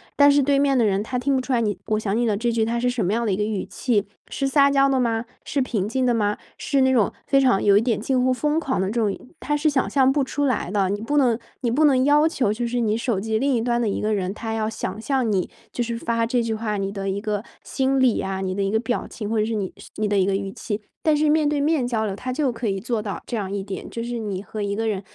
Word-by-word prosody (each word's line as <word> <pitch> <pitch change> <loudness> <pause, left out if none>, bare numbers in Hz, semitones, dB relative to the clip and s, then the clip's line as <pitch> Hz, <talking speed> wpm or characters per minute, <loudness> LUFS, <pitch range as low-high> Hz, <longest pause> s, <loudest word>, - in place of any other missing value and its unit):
但 285 0 +6
是 285 0 +4
对 280 +1 +3
面 275 -1 +3
的 235 - +3
人 195 -1 +1
他 250 +4 -3
听 270 +2 +1
不 260 - +1
出 265 - -5
来 245 - +3
你 210 -3 -1
“我 215 -1 +1
想 205 -2 -1
你 240 +1 +1
了” 210 -2 +1
这 235 +2 0
句 230 -1 +1
它 230 +2 -1
是 245 +1 +1
什 245 -4 -1
么 180 - 0
样 235 +1 0
的 205 - +1
一 - - +1
个 210 - -1
语 210 -2 -2
气。 215 -5 -1 0.2
是 275 - -1
撒 280 +1 +4
娇 275 0 +4
的 270 -1 +2
吗？ 230 -2 0 0.2
是 280 - -2
平 220 -7 -1
静 260 +1 0
的 245 - +3
吗？ 210 -2 0 0.2
是 275 -2 +1
那 260 0 +4
种 225 -6 +3
非 275 -1 +3
常 255 -7 +3
有 200 -1 +5
一 - - +4
点 230 -2 0
近 255 +3 0
乎 255 - +3
疯 300 +5 +1
狂 270 -9 -1
的 190 - 0
这 230 +4 -1
种 205 -3 0 0.2
他 295 0 -1
是 300 +2 0
想 270 -3 0
象 265 -2 +4
不 285 -1 +2
出 285 +2 -1
来 255 -9 0
的。 200 -2 +1
你 205 +1 -2
不 290 +6 -1
能 245 -5 +3 0.2
你 240 -3 0
不 300 +6 +3
能 260 -3 +4
要 295 +2 +5
求 250 -10 0
就 235 +2 -2
是 245 +1 -1
你 220 -2 +1
手 230 -3 -1
机 220 +2 -1
另 275 +1 +2
一 230 - +1
端 240 0 0
的 225 - +1
一 - - -2
个 215 +1 0
人， 190 -2 -1
他 220 +1 -5
要 220 -1 -1
想 215 -1 -5
象 260 -2 0
你， 190 -4 0 0.2
就 240 - -1
是 235 0 -3
发 230 0 0
这 245 0 +1
句 230 -1 -1
话 215 -1 -2
你 195 0 -2
的 195 -1 -3
一 195 +1 -2
个 210 0 -2 0.2
心 270 0 0
理 255 -4 +4
呀、 190 0 -2
你 185 -1 -2
的 200 - -1
一 195 - 0
个 220 - +2
表 240 +1 -2
情， 210 - -6
或 225 0 0
者 215 - +2
是 225 0 -2
你 200 -3 -3 0.2
你 215 0 -1
的 205 0 +1
一 185 - +3
个 195 - +1
语 195 0 -3
气。 210 -2 -4 0.2
但 310 -1 +3
是 305 +1 +2
面 305 0 +3
对 295 -1 0
面 290 -4 +1
交 225 -3 0
流， 200 -2 -3
它 255 +5 -5
就 275 0 0
可 230 0 -4
以 195 -1 0
做 225 +2 -2
到 205 -2 -4
这 - - -4
样 200 -4 -3
一 200 -1 -3
点， 195 -1 -6
就 230 - -5
是 240 0 -4
你 200 -3 -4
和 215 0 -6
一 200 0 -1
个 225 +2 -2
人， 205 -3 -1
230 Hz, 330 characters per minute, -23 LUFS, 210-260 Hz, 0.2 s, 但